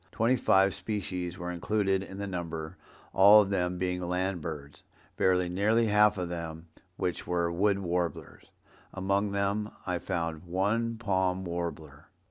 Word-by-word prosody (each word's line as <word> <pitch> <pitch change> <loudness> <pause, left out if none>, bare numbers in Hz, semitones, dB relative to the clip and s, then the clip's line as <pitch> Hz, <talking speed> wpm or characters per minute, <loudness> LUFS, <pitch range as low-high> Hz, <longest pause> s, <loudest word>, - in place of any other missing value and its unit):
Twenty 115 +3 +2
five 95 -5 +3
species 90 -3 -4
were 90 -1 -4
included 95 +2 0
in 95 0 -8
the 100 - -3
number, 85 -4 -5 0.4
all 105 +2 +8
of 100 - -5
them 90 -2 0
being 90 0 -1
land 90 0 -1
birds, 75 -3 -7 0.3
very 90 -1 +2
nearly 105 +6 +2
half 105 0 +4
of 85 -3 -5 0.3
which 90 -2 -3
were 85 -1 0
Wood 100 +3 +2
Warblers. 90 -4 -3 0.5
Among 100 +2 0
them 100 +2 -1 0.2
I 90 -2 -1
found 85 -2 -3
one 105 +6 0
Palm 95 -4 0
Warbler." 80 -4 -5
95 Hz, 140 wpm, -29 LUFS, 85-100 Hz, 0.5 s, all